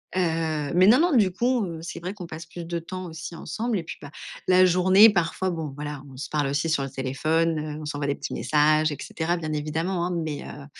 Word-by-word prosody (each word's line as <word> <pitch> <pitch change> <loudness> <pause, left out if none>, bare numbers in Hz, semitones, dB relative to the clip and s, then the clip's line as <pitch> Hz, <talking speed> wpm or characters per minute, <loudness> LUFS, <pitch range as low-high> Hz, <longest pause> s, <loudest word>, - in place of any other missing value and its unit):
Heu, 160 -4 0
mais 185 +2 +6
non, 245 +6 +7
non, 340 -4 +3
du 200 -5 +4
coup, 240 +2 +1
heu, 165 -3 -6
c'est 170 - -6
vrai 180 +3 -5
qu'on 185 -4 -7
passe 160 +1 -8
plus 170 +1 -8
de 170 0 -3
temps 185 +2 -7
aussi 160 +1 -7
ensemble 230 +6 -2
et 165 - -5
puis - - -8
ben, 145 - -9 0.4
la 185 0 +6
journée 185 +4 +7
parfois 180 0 0
bon, 160 -4 -4
voilà, 145 -1 -6
on 130 - -12
se 145 - -6
parle 150 -2 0
aussi 145 +4 0
sur 155 -3 +1
le 135 - -4
téléphone, 155 +5 0
heu, 150 0 -5
on 150 - -7
s'envoie 145 -1 -3
des 140 - 0
petits - - -6
messages 155 +1 +3
et 145 - -4
cetera 170 +2 -2
bien 155 -2 -4
évidemment, 165 +4 -1
hein, - - -3
mais, 160 -3 -3
heu, 145 - -9
165 Hz, 245 wpm, -25 LUFS, 150-180 Hz, 0.4 s, non